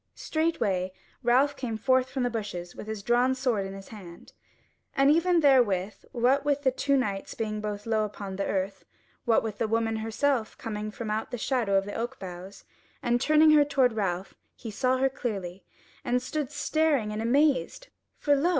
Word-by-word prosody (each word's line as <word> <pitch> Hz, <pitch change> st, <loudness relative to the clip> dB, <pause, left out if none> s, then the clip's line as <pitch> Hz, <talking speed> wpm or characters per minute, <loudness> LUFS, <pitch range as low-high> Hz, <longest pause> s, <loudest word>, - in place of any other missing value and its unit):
Straightway 220 Hz, -, -1 dB, 0.3 s
Ralph 260 Hz, +4 st, +3 dB
came 230 Hz, -4 st, -4 dB
forth 260 Hz, +2 st, +2 dB
from 260 Hz, -1 st, -2 dB
the 245 Hz, -, 0 dB
bushes 190 Hz, -6 st, -5 dB
with -, -, -8 dB
his 215 Hz, -2 st, -5 dB
drawn 245 Hz, +3 st, +3 dB
sword 240 Hz, -7 st, 0 dB
in 195 Hz, -, -7 dB
his 195 Hz, 0 st, -11 dB
hand, 180 Hz, -6 st, -12 dB, 0.6 s
and 275 Hz, +1 st, +5 dB
even 335 Hz, +2 st, +3 dB
therewith 215 Hz, -9 st, +3 dB
what 260 Hz, +3 st, +2 dB
with 285 Hz, 0 st, 0 dB
the 260 Hz, -, +4 dB
two 280 Hz, +2 st, +1 dB
knights 200 Hz, -6 st, -2 dB
being 215 Hz, -1 st, -3 dB
both 210 Hz, -1 st, -4 dB
low 220 Hz, -1 st, +1 dB
upon 200 Hz, -2 st, -5 dB
the 195 Hz, +1 st, -2 dB
earth, 190 Hz, 0 st, -2 dB, 0.4 s
what 230 Hz, -2 st, +3 dB
with 215 Hz, -2 st, -5 dB
the 225 Hz, -, +1 dB
woman 225 Hz, 0 st, 0 dB
herself 225 Hz, +2 st, -1 dB
coming 215 Hz, -2 st, -4 dB
from 215 Hz, 0 st, -5 dB
out 215 Hz, +1 st, -2 dB
the 245 Hz, -, -4 dB
shadow 230 Hz, -4 st, 0 dB
of 195 Hz, 0 st, +3 dB
the 205 Hz, -, -6 dB
oak 240 Hz, +2 st, -4 dB
boughs, 185 Hz, +1 st, -9 dB, 0.4 s
and 240 Hz, 0 st, +1 dB
turning 310 Hz, +2 st, +5 dB
her 300 Hz, -1 st, +7 dB
toward 265 Hz, -4 st, +2 dB
Ralph, 190 Hz, -3 st, -2 dB, 0.2 s
he 225 Hz, -, -8 dB
saw 255 Hz, +4 st, +1 dB
her 265 Hz, +1 st, +3 dB
clearly, 195 Hz, -8 st, -5 dB, 0.4 s
and 245 Hz, +1 st, +1 dB
stood 280 Hz, +2 st, -3 dB
staring 290 Hz, -6 st, +1 dB
and 215 Hz, -, -3 dB
amazed 290 Hz, -, +1 dB, 0.3 s
for 290 Hz, -1 st, +3 dB
lo! 295 Hz, +5 st, +2 dB
230 Hz, 185 wpm, -27 LUFS, 205-270 Hz, 0.6 s, her